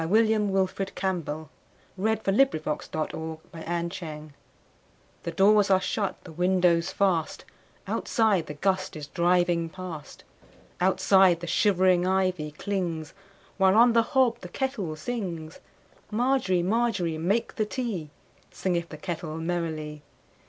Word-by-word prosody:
William 215 +1 +3
Wilfred 190 0 -1
Campbell 160 -5 -3 0.5
1861–1918 220 +3 +2
A 220 - -19
Canadian 210 -1 +3
Folk 150 - -2
Song 155 -1 -3
CampbllWW 160 -1 -6 0.9
THE 170 - -4
DOORS 200 +3 +4
are 190 -1 +5
shut, 195 +1 -2
the 175 - -10
windows 175 0 +2
fast, 185 -5 0 0.4
Outside 215 -8 +1
the 150 - -6
gust 185 +3 0
is 150 -2 -6
driving 175 0 +1
past, 175 -4 -8 0.6
Outside 190 -1 +4
the - - -4
shivering 185 -1 +3
ivy 185 -5 +1
clings, 170 -2 -3 0.5
While 190 0 +5
on 235 +1 +6
the 230 - +5 0.2
hob 250 -3 +4
the 180 - -8
kettle 210 - -3
sings. 170 -5 -5 0.5
Margery, 230 -6 +1
Margery, 195 -6 0
make 200 +8 0
the 215 - +1
tea, 210 - -3 0.4
Singeth 170 -2 -2
the 155 - -8
kettle 160 -2 -5
merrily. 160 -3 -3
180 Hz, 125 wpm, -27 LUFS, 165-200 Hz, 0.9 s, on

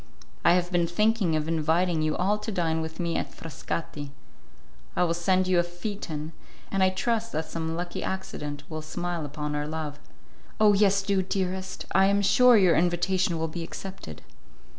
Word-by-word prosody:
I 170 - +6
have 180 0 +1
been 175 -1 +2
thinking 210 -1 +2
of 155 0 -1
inviting 165 +1 +1
you 155 -1 0
all 200 +4 +1
to 210 +1 -4
dine 165 -4 0
with 160 +2 -6
me 170 -1 -1
at - - -3
Frascati. 150 -1 -5 0.9
I - - +3
will 170 -1 +1
send 185 +2 +2
you 185 -1 +3
a - - +4
phaeton, 175 -3 -5 0.4
and 195 - 0
I 190 - +5
trust 225 +4 -1
that 160 +1 -1
some 160 0 -3
lucky 175 +1 -4
accident 150 -6 -4
will 155 -1 -5
smile 170 0 -3
upon 150 +1 -4
our 150 0 -2
love." 155 -2 -4 0.6
"Oh! 210 -1 +6
yes, 200 -1 +3
do, 195 -1 +1
dearest! 185 0 -3
I 190 0 +5
am 200 +1 +2
sure 250 +3 +6
your 185 -5 +5
invitation 175 +1 +1
will 160 0 -1
be 170 +2 -5
accepted." 165 - -8
175 Hz, 180 wpm, -27 LUFS, 160-190 Hz, 0.9 s, I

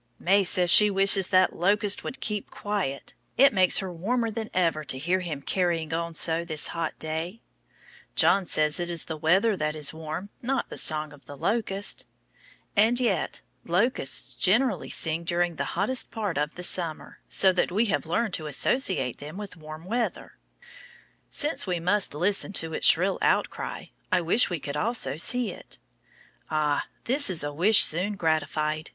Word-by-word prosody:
May 195 +3 +2
says 180 -1 +3
she 210 +3 +8
wishes 195 -1 +4
that 185 -1 +2
locust 205 +3 +1
would 260 - -6
keep 210 -1 -2
quiet. 200 -10 -4 0.2
It 275 0 +5
makes 185 -2 +5
her 190 -2 -3
warmer 225 +7 -2
than 220 0 -5
ever 165 -4 0
to 130 - -2
hear 175 +7 0
him 155 -6 -6
carrying 170 -3 -1
on 170 0 -3
so 165 +1 +1
this 155 -3 0
hot 165 -2 -4
day. 160 +6 -4 0.8
John 195 -2 +3
says 150 +1 +1
it 175 0 -3
is 170 -1 -4
the 160 - -5
weather 190 +8 +2
that 155 -3 -3
is 150 0 -2
warm, 160 +4 -7
not 265 +2 -2
the - - -8
song 155 -1 0
of 140 -3 -18
the 145 - -10
locust. 205 - -1 0.7
And 225 +4 +3
yet, 245 - -1 0.2
locusts 180 - 0
generally 220 +2 +1
sing 160 +1 0
during 175 -1 -1
the - - -2
hottest 250 +7 +1
part 210 -6 -4
of 150 +1 -2
the 180 - -7
summer, 170 -3 -1
so 190 - +3
that 180 - 0
we 215 +6 +1
have - - -2
learned 205 +4 -1
to 155 -4 -3
associate 150 - 0
them 150 +5 -9
with 205 -3 -8
warm 155 0 -11
weather. 230 +4 -3 1.0
Since 295 -7 -1
we 180 -2 -1
must 185 -1 0
listen 195 +5 0
to 165 -3 -4
its - - +3
shrill - - +4
out - - +1
cry, - - -8 0.2
I 185 - +2
wish 175 +9 +2
we 175 -3 -3
could 140 0 -6
also 205 - -2
see 235 +7 0
it. - - -11 0.7
Ah, 150 -2 -1 0.2
that 275 0 +1
is 175 -5 +1
a 145 0 -4
wish 195 +8 +7
soon 185 +6 +2
gratified! 155 -3 -2
180 Hz, 175 wpm, -26 LUFS, 155-205 Hz, 1.0 s, she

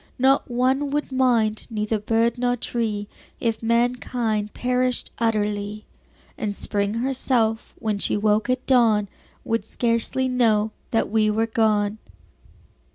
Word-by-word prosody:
Not 265 +2 +3
one 260 +4 +1
would 295 0 -2
mind, 235 -5 +1
neither 215 -1 -1
bird 225 +3 +1
nor 245 0 +1
tree 220 -4 -2 0.3
If 230 -2 -1
mankind 235 -2 0
perished 250 0 0
utterly; 210 -2 -1 0.5
And 205 -2 -2
Spring 200 +1 -1
herself, 240 -3 0
when 215 -2 -2
she - - +1
woke 215 +2 +1
at 255 0 0
dawn, 225 -6 +3 0.3
Would 225 -2 -1
scarcely 230 +3 0
know 220 -4 +2 0.2
that 225 - 0
we 215 -1 +3
were 220 +2 +1
gone. 215 -2 +1
225 Hz, 125 wpm, -23 LUFS, 215-250 Hz, 0.5 s, Not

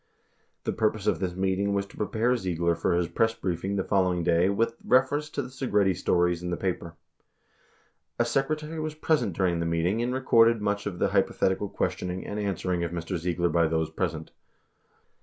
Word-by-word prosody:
The - - -1
purpose 110 -2 0
of - - +1
this 90 -2 -2
meeting 95 +1 0
was 100 0 0
to - - -17
prepare 115 +4 +1
Ziegler 85 -5 0
for 85 +1 0
his 85 -1 +1
press 115 +5 +1
briefing 95 -2 -2
the 95 - 0
following 90 -3 +1
day 85 +2 +3
with 115 +3 0
reference 140 +4 +2
to 145 - -3
the 125 - -8
Segretti 105 -8 +1
stories 90 0 +1
in 90 - -4
the 85 - -2
paper. 85 -3 -3 1.2
A 120 - +2
secretary 150 +6 -1
was 155 -1 -3
present 155 - +1
during 90 -3 +1
the 85 - -1
meeting 85 +7 0
and 120 +1 -1
recorded 115 -3 +4
much 105 0 -1
of 95 -4 -4
the - - +1
hypothetical 95 +2 +1
questioning 90 0 -3
and 105 - -4
answering 90 -3 -1
of 85 - -1
Mr. 85 +2 -4
Ziegler 85 +1 0
by 85 -1 +3
those 80 -1 -1
present 80 -2 -3
95 Hz, 185 wpm, -27 LUFS, 85-115 Hz, 1.2 s, recorded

